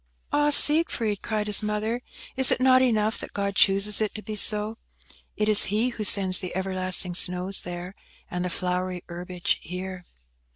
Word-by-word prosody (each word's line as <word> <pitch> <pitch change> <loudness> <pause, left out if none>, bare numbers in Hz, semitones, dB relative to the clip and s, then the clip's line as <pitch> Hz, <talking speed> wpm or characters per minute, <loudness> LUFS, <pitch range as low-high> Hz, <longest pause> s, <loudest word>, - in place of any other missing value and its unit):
"Ah, 295 0 +1
Siegfried!" 285 - +3
cried 215 -2 -4
his 210 -1 +5
mother, 215 +3 -3 0.3
"is 265 -1 +4
it - - +1
not 255 0 +3
enough 220 -3 0
that - - -9
God 200 -1 -4
chooses 200 +2 +3
it 215 - -3
to 215 - -8
be 215 - -7
so? 210 +2 -1 0.6
It 210 - -1
is 215 -1 +5
He 215 +5 -1
who 230 -3 -7
sends 190 -2 +5
the 185 -2 -5
everlasting 185 -1 -1
snows 180 +2 0
there, 175 +1 -8 0.3
and 180 0 -5
the 180 - -3
flowery 180 0 -4
herbage 175 0 -4
here." 180 +1 -8
200 Hz, 170 wpm, -24 LUFS, 185-215 Hz, 0.6 s, his